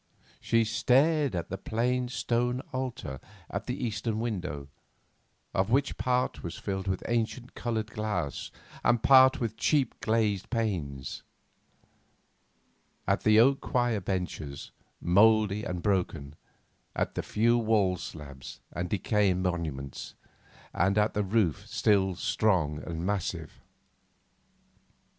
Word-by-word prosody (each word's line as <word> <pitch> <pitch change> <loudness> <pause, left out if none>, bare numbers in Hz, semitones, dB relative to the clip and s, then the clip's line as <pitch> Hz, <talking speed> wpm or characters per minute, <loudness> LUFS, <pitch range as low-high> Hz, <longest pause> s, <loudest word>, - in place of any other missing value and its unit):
She 115 0 +2
stared 135 - +2
at 85 -1 -3
the 95 - -3
plain 125 +3 0
stone 125 0 0
altar, 125 - -4 0.3
at 100 +3 -4
the 125 - -2
eastern 110 0 -2
window, 90 -12 -3 0.9
of 95 +2 +1
which 140 +4 +2
part 125 0 0
was 85 - -5
filled 95 -1 -4
with 95 -1 -1
ancient 120 +1 -2
coloured 115 -2 -3
glass 105 -9 -3 0.3
and 120 -1 +3
part 130 -1 +7
with 115 -2 -3
cheap 140 -6 +1
glazed 110 -4 0
panes; 85 - -2 1.9
at - - +2
the 110 0 +5
oak 135 +4 +5
choir 120 -3 +1
benches, 85 -7 -4 0.3
mouldy 105 +2 +4
and 90 -6 -4
broken; 90 -8 -1 0.6
at - - -1
the - - -2
few 120 +3 +2
wall 105 -5 +2
slabs 75 -6 -9
and 85 +2 -3
decaying 100 -1 +1
monuments, 75 -7 -4 0.6
and 95 +4 +2
at 105 +1 +3
the 105 - 0
roof 100 -6 0
still 95 -3 +2
strong 95 -8 +1
and 85 0 -4
massive. 90 -5 -3
105 Hz, 120 wpm, -29 LUFS, 90-115 Hz, 1.9 s, part